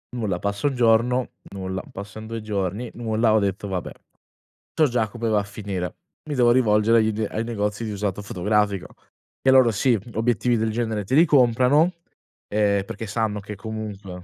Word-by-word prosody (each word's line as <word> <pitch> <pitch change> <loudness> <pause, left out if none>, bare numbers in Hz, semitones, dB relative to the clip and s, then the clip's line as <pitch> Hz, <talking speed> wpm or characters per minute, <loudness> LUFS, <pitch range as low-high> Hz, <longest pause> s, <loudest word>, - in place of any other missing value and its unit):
Nulla. 105 -7 -2
Passa 100 +6 -1
1 135 - -1
giorno, 120 +1 +3 0.2
nulla. 95 -1 -4
Passan 105 +2 -8
2 115 0 -5
giorni, 105 +2 -3
nulla. 110 -1 +1
Ho 110 - +5
detto: 100 0 -2
"Vabbè, 95 -2 -4 0.8
so 155 - +4
già 120 -3 0
come 115 +2 -4
va 105 -1 +3
a - - -2
finire, 100 -3 -5 0.3
mi 145 - -2
devo 120 -1 +4
rivolgere 115 -2 +4
agli 110 0 +2
d 110 0 -2
ai 110 - -2
negozi 105 -1 -2
di 110 - -3
usato 100 -1 -3
fotografico." 100 0 0 0.5
E 130 - +4
loro, 130 -3 +6
sì, 115 +1 +2
obiettivi 115 +1 +1
del 110 0 0
genere 110 -2 -2
te 115 - -4
li 165 +4 +7
comprano, 135 +3 +4 0.6
ehm, 100 -1 +1
perché 110 +3 -6
sanno 105 0 -1
che 105 +1 -8
comunque 100 -3 -7
110 Hz, 175 wpm, -23 LUFS, 100-120 Hz, 0.8 s, li